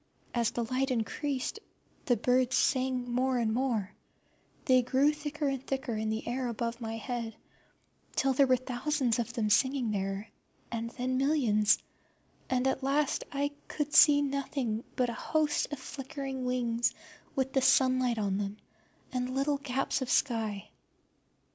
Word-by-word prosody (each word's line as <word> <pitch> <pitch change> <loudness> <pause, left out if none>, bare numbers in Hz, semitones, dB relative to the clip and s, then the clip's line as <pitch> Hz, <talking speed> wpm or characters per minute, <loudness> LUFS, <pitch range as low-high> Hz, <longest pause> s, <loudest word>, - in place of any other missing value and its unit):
As 235 -2 +2
the 240 - -2
light 255 +4 0
increased 260 - -2 0.5
the 245 -6 +3
birds 250 +3 +2
sang 255 -2 +1
more 255 +1 +1
and 225 -2 +1
more; 235 -5 0 0.7
they 255 -1 +5
grew 265 +4 +3
thicker 300 0 -3
and 270 -2 -2
thicker 265 -4 -2
in 215 0 -1
the 220 +1 -3
air 250 +1 -1
above 235 +1 -3
my 225 0 -4
head, 230 -1 -4 0.8
till 270 0 +2
there 275 +1 +4
were 255 0 +4
thousands 255 0 -1
of 235 0 -2
them 220 -3 0
singing 260 +1 +2
there, 195 +1 -2 0.4
and 230 0 -3
then 255 +1 0
millions, 235 -8 +3 0.7
and 255 0 +1
at 265 0 +1
last 275 +2 +1
I 285 0 -1 0.2
could 295 -1 -3
see 290 -2 +7
nothing 270 -5 -2
but 245 -2 +1
a - - -5
host 305 +4 0
of 290 - -3
flickering 265 0 -5
wings 240 -2 0 0.4
with 265 0 -1
the 265 - +3
sunlight 255 -2 +3
on 200 -2 0
them, 205 0 -3 0.5
and 255 0 -2
little 280 +1 +1
gaps 270 0 -1
of 260 - -3
sky. 220 -6 0
255 Hz, 155 wpm, -30 LUFS, 230-270 Hz, 0.8 s, see